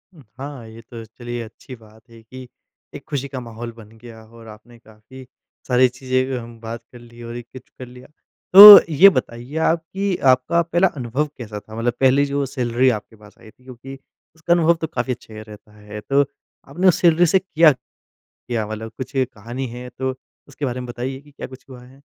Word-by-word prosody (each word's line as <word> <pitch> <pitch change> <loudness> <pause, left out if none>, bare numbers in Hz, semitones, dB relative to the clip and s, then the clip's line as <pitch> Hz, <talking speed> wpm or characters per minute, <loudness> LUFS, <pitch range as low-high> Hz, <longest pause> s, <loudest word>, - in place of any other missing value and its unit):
उम, 150 - -17 0.2
हाँ, 135 -4 -8
ये 110 +1 -13
तो 115 0 -11
चलिए 120 +2 -8
अच्छी 115 +3 -13
बात 110 +1 -21
है 115 -1 -16
कि 130 +2 -12 0.5
एक - - -10
खुशी 140 -1 -3
का 135 -2 -7
माहौल 115 -1 -8
बन 110 0 -16
गया 110 -1 -14
और 115 0 -16
आपने 110 +3 -15
काफ़ी 110 +4 -16 0.4
सारी 125 0 +4
चीज़ें 130 +1 -2
कि 135 - -5
हम 115 -1 -10
बात 115 +1 -7
कर 120 - -14
ली 120 0 -16
और 115 0 -8
ये 120 - -6
कुछ 120 +2 -14 0.2
कर 130 - -7
लिया। 125 +1 -15 0.5
तो 205 +1 +13
ये 190 +7 +8
बताइए 125 -2 -5
आप 165 - +1
कि 195 0 -1 0.2
आपका 130 +7 +1
पहला 170 +3 +1
अनुभव 130 +5 -2
कैसा 105 -4 -8
था 110 +1 -14
मतलब 115 +1 -1
पहली 135 +2 +3
जो 140 0 -2
सैलरी 125 -1 0
आपके 110 +1 -16
पास 105 -1 -19
आई 110 - -16
थी 125 - -30
क्योंकि 130 +1 -11 0.4
उसका 160 +2 0
अनुभव 170 -1 +3
तो 160 - -2
काफ़ी 125 -2 -3
अच्छा 115 -2 -14
ही 110 - -9
रहता 105 0 -15
है, 105 0 -10
तो 140 +5 +1 0.4
आपने 180 +7 0
उस 180 - +3
सैलरी 170 0 +4
से 190 +3 +3
किया 165 -4 +3 0.6
क्या? 115 -3 -6
मतलब 110 +1 -7
कुछ 130 +1 -7
कहानी 125 0 -4
है 125 +1 -9
तो 130 +1 -4 0.4
उसके 145 +1 -6
बारे 125 -1 -4
में 125 - -7
बताइए 130 +2 -6
कि 145 - -21
क्या 140 - -9
कुछ 130 -2 -15
हुआ 125 -2 -12
है? 135 +2 -20
125 Hz, 210 wpm, -20 LUFS, 115-140 Hz, 0.6 s, तो